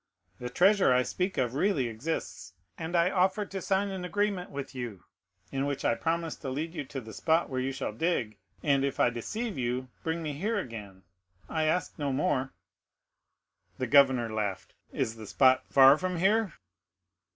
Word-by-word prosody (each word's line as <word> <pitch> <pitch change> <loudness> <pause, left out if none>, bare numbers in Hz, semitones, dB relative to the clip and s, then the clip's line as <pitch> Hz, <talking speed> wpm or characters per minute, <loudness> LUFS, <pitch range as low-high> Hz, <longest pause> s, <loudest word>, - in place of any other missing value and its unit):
"The 125 - -4
treasure 190 +4 +4
I 125 0 +4
speak 185 +8 -2
of 125 -2 0
really 145 -4 +1
exists, 120 +9 -4 0.2
and 165 +2 -4
I 170 +2 +4
offer 190 +2 +2
to 195 0 -6
sign 195 +2 +1
an 190 -2 -5
agreement 200 0 -1
with 140 -1 -6
you, 120 -8 -6 0.5
in 135 +1 -1
which 140 -1 -3
I - - +4
promise 165 +4 -1
to 135 - -6
lead 155 +5 -3
you 165 - -4
to 135 - -6
the 110 -2 -10
spot 160 +6 +1
where 130 - -1
you 130 +1 -1
shall 130 - -3
dig; 120 -5 -1 0.2
and 140 -2 +3
if 140 - -2
I 120 - +4
deceive 205 - -4
you, 125 +1 -2
bring 165 +1 -2
me 150 -2 -3
here 205 +10 -1
again,—I 95 - -6
ask 165 +2 -1
no 145 -2 0
more." 130 -1 0 1.3
The 130 - -1
governor 130 -4 +4
laughed. 100 -4 -3 0.2
"Is 110 0 -2
the 110 -1 -9
spot 130 +3 +4
far 135 +2 +7
from 185 -1 -2
here?" 200 +1 +2
140 Hz, 175 wpm, -29 LUFS, 125-180 Hz, 1.3 s, far